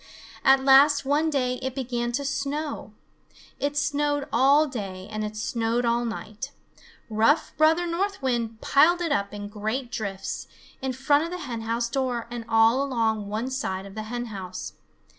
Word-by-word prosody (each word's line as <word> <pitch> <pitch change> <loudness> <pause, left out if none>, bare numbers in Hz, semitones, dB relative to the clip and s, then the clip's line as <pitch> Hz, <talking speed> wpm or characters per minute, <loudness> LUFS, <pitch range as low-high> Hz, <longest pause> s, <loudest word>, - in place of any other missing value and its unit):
At 270 0 +5
last 275 +1 +6
one 295 +3 +2
day 250 -4 0
it 260 0 -3
began 240 -2 -2
to 280 +3 -1
snow. 280 -3 -3 0.7
It 285 +1 -1
snowed 290 0 0
all 275 +5 +5
day 195 -9 -6
and 215 0 -3
it 210 0 -5
snowed 230 +2 0
all 235 +1 +1
night. 225 +2 -5 0.6
Rough 225 +8 +2
Brother 320 +3 +4
North 385 +4 -1
Wind 235 -4 -2
piled 345 +5 +4
it 335 -3 -1
up 200 -7 0
in 205 0 -6
great 220 +5 -3
drifts 200 -5 -4 0.3
in 265 -1 -2
front 285 +4 +2
of - - -5
the 360 - -4
hen 230 -3 -4
house 230 +1 -1
door 250 -2 -1
and 235 -1 -5
all 225 +3 +5
along 225 -6 0
one 225 +5 -2
side 190 -8 -3
of 195 - -10
the 215 - -5
hen 240 0 -3
house. 185 -2 -6
250 Hz, 170 wpm, -26 LUFS, 225-285 Hz, 0.7 s, last